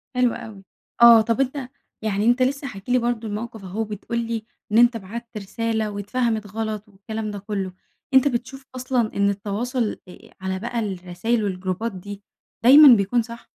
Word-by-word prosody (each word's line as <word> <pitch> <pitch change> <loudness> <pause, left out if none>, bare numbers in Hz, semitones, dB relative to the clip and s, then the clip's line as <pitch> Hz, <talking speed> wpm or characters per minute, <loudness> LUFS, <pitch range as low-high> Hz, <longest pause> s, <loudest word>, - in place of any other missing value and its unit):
حلو 250 -2 +3
أوي. 220 -5 -9 0.4
آه، 235 -1 +9
طب 230 +4 0
أنتَ 265 -1 -2 0.3
يعني 210 -1 -1
أنت 240 +2 +3
لسه 275 +2 0
حاكي 200 +1 -7
لي 250 - +5
برضه 235 -1 -2
الموقف 220 0 -6
أهو، 190 +4 -6
وبتقول 220 +2 -4
لي 230 -1 -3 0.3
إن 215 - +3
أنتَ 240 0 +5
بعَتّ 230 +4 -8
رسالة 220 +1 -2
واتفهَمِت 215 +1 -2
غلط 215 -1 -3
والكلام 210 +2 -6
ده 205 - -6
كلُّه، 195 -2 -4 0.4
أنتَ 265 +1 +6
بتشوف 265 +1 -4
أصلًا 250 -3 -1
إن 200 0 +3
التواصل 215 +4 -2
إإ 180 - -14
على 190 0 -3
بقى 235 +2 -3
الرسايل 195 +3 -2
والجروبات 185 +3 -2
دي، 200 +1 -9 0.4
دايمًا 285 +4 +9
بيكون 205 +4 +1
صح؟ 235 +1 -9
220 Hz, 170 wpm, -23 LUFS, 200-240 Hz, 0.4 s, آه